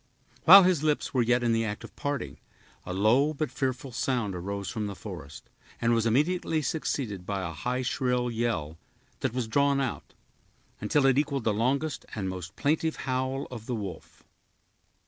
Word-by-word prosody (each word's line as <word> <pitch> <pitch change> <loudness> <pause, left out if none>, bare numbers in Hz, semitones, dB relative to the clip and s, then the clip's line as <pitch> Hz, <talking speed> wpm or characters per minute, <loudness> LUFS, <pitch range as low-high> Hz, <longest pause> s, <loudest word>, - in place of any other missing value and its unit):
While 195 +3 +11
his 180 -5 +3
lips 150 -1 0
were 130 - +3
yet 120 +1 +2
in 115 -1 +2
the 115 0 +2
act 105 -2 -4
of - - -11
parting, 140 - -3 0.5
a - - -3
low 120 +11 +3
but 155 +1 -2
fearful 130 -1 -2
sound 120 -3 -1
arose 100 +2 -4
from 110 -2 -3
the 100 - -6
forest, 80 -10 -9 0.3
and 120 0 +2
was 115 0 +2
immediately 155 +5 +1
succeeded 125 - -2
by 100 0 -3
a 80 - -6
high, 125 +10 -2
shrill 125 -1 0
yell, 110 -10 -2 0.4
that 130 -2 -2
was 125 -3 -1
drawn 140 +3 +2
out, 135 -3 -4 0.6
until 135 +7 +2
it 135 0 +5
equaled 140 -3 -1
the 110 - +2
longest 135 +8 -1
and 100 -3 -2
most 95 0 -7
plaintive 160 +2 +1
howl 130 +1 -1
of 115 -3 -8
the 125 - -1
wolf. 100 -4 -7
125 Hz, 175 wpm, -28 LUFS, 105-140 Hz, 0.6 s, While